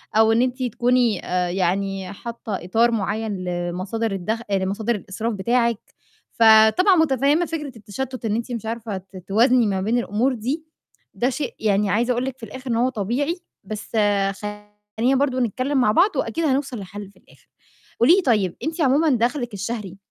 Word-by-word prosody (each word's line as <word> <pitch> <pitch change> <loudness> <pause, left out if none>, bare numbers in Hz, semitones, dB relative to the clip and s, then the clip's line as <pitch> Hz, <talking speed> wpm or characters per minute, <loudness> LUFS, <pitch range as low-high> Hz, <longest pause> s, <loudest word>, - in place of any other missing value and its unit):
أو 220 0 +5
إن 225 - +3
أنتِ 255 +1 -1
تكوني 245 -3 +1
آآ 180 -1 0
يعني 190 +1 -1
حاطّة 230 0 -7
إطار 225 +6 +2
معيّن 210 -2 -2
لمصادر 180 +5 -2
الدَخ 195 +4 -2
لمصادر 200 +4 0
الإسراف 215 +3 -4
بتاعِك، 235 +2 +1 0.5
فطبعا 225 - +6
متفهِّمة 295 +1 +3
فكرة 295 -7 -5
التشتُّت 240 +4 -6
إن 215 -1 0
أنتِ 235 +2 -3
مش 230 -3 -4
عارفة 225 -2 -4
ت 190 0 -12
توازني 235 +3 +4
ما 190 -2 -1
بين 225 +5 +1
الأمور 240 +3 0
دي، 260 +8 -3 0.5
ده 245 - 0
شيء 290 +3 -4
يعني 205 -1 +1
عايزة 235 +5 +1
أقول 245 +1 0
لِك 265 -1 -5
في 235 - -19
الآخِر 255 +4 -8
إن - - +1
هو 245 +3 +2
طبيعي، 260 - -2 0.2
بس 210 +1 -7 0.5
خلّينا 210 +4 -3
برضه 265 -1 +1
نتكلِّم 255 +4 -1
مع 210 - +4
بعض 360 - +3
وأكيد 330 0 -1
هنوصل 270 -4 0
لحل 200 +1 -8
في 190 - -25
الآخِر. - - -24 0.5
قولي 275 +10 +6
لي 390 - +2
طيب، 210 - +1
أنتِ 320 +3 -2
عموما 295 +3 +3
دَخْلِك 245 0 0
الشهري 200 -1 -5
230 Hz, 170 wpm, -22 LUFS, 205-255 Hz, 0.5 s, فطبعا